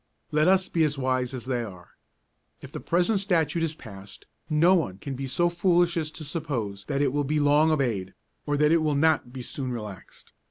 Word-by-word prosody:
Let 155 +2 +3
us 190 0 +4
be 165 - +1
as 145 -2 0
wise 130 -1 0
as 130 -3 -7
they 125 -2 -1
are. 90 -5 -10 0.7
If - - -11
the - - -6
present 180 +5 +1
Statute 170 -5 0
is 160 -1 -1
passed, 100 -6 -12 0.2
no 165 +4 +4
one 145 - 0
can 140 +7 -6
be 135 +1 -4
so 175 +7 +1
foolish 175 0 +2
as 160 -2 -1
to 155 - -7
suppose 130 -11 -4
that 140 0 0
it 135 -2 +1
will 145 0 +1
be 150 +2 0
long 145 +2 +4
obeyed, 115 -11 -1 0.3
or 145 0 +1
that 150 +1 +3
it 165 -1 +4
will 155 -2 +1
not 145 -4 +2
be 125 -1 -7
soon 130 0 -4
relaxed. 105 -5 -9
145 Hz, 210 wpm, -26 LUFS, 125-165 Hz, 0.7 s, us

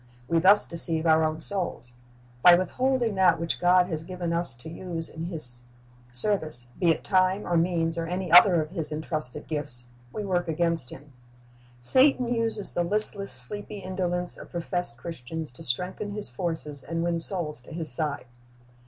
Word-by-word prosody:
We 165 +3 +1
thus 195 +5 +6
deceive 165 -1 -2
our 160 0 +3
own 155 0 -2
souls. 170 - -1 0.5
By 175 +5 +7
withholding 240 +5 -1
that 185 -3 +2
which 165 0 -4
God 180 0 +3
has 160 -3 -5
eiven 175 -2 -4
us 170 -6 -2
to 125 +5 -14
use 165 0 -4
in 160 +1 -8
His 140 -9 -4 0.5
service, 155 -2 -3
be 175 - +1
it 165 - 0
time 185 +1 0
or 175 - -2
means 165 -1 -1
or 165 - -4
any 180 0 -5
other 175 -1 +6
of 155 - -13
His 165 -5 -3
entrusted 155 -3 -5
gifts, 125 -6 -1 0.2
we 210 +8 -6
work 180 -3 -2
against 165 -4 -1
Him. 140 0 -13 0.7
Satan 255 - +3
uses 225 -3 0
the 175 - -2
listless, 200 +1 +6
sleepy 205 +12 +5
indolence 180 -2 -3
of - - -13
professed 175 -6 -5
Christians 160 -1 -8
to 125 - -16
strengthen 180 +10 -1
his 205 -4 -4
forces 150 0 -5
and 165 +4 -5
win 170 -1 -2
souls 165 -6 -2
to - - -16
his 160 -1 0
side. 150 -5 0
170 Hz, 170 wpm, -25 LUFS, 155-185 Hz, 0.7 s, By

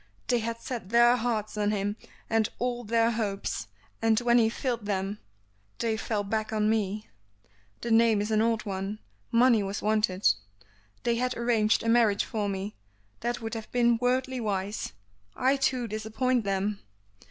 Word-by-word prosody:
They 245 - +3
had 230 +1 -3
set 230 -5 -6
their 240 +2 +6
hearts 225 -3 -2
on 205 0 +2
him, 205 0 -1 0.3
and 225 -1 +2
all 245 0 -2
their 230 +1 +2
hopes, 200 - -2 0.3
and 225 -1 +3
when 240 0 +4
he 220 -1 +4
failed 235 -3 -3
them 200 +1 -2 0.6
they 225 -1 0
fell 220 -1 -2
back 215 +2 -2
on 215 0 +2
me. 210 -1 -1 0.7
The 235 - -3
name 225 -1 +5
is 210 +2 -2
an 215 0 +3
old 225 -1 +1
one; 195 +1 -3 0.3
money 235 -1 +5
was 195 0 -4
wanted. 210 -3 +2 0.8
They 235 -1 +1
had 250 +1 -1
arranged 225 -3 +2
a - - -3
marriage 230 -3 +4
for 210 -2 -2
me, 195 +1 -4 0.5
that 240 +1 -2
would 225 0 -4
have 225 -1 -6
been 240 -1 +3
worldly 255 +1 +1
wise. 200 - -2 0.4
I 265 +2 +3
too 255 -3 0
disappointed 220 +3 -1
them!" 195 +1 -1
220 Hz, 165 wpm, -28 LUFS, 210-235 Hz, 0.8 s, their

